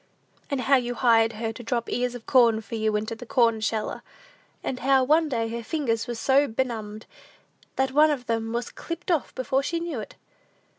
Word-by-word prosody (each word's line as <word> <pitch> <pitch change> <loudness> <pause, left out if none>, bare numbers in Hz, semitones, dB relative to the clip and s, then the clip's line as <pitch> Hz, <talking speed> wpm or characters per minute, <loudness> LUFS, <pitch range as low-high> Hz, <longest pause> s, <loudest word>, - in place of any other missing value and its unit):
"And 280 -2 -1
how 275 +1 +4
you 245 -1 -2
hired 225 -2 +4
her 225 +1 -3
to 240 - -9
drop 235 0 -2
ears 245 0 -1
of 240 - -9
corn 235 -4 +4
for 210 +1 -12
you 220 -1 0
into 215 +2 -2
the 230 - -9
corn 230 -3 +2
sheller; 215 0 -2 0.6
and 255 - -3
how, 265 0 +3
one 310 +4 +3
day, 230 -4 -1
her 235 +1 -5
fingers 230 -4 -1
were 240 - -3
so 270 +5 +3
benumbed, 220 -3 -3 0.7
that 265 0 +1
one 300 +3 +5
of 275 -5 -2
them 225 -1 -2
was 235 0 -3
clipped 335 +2 -5
off 325 -5 -1
before 265 +1 0
she 335 +4 -2
knew 335 -7 -4
it!" 215 - -8
240 Hz, 200 wpm, -25 LUFS, 225-270 Hz, 0.7 s, one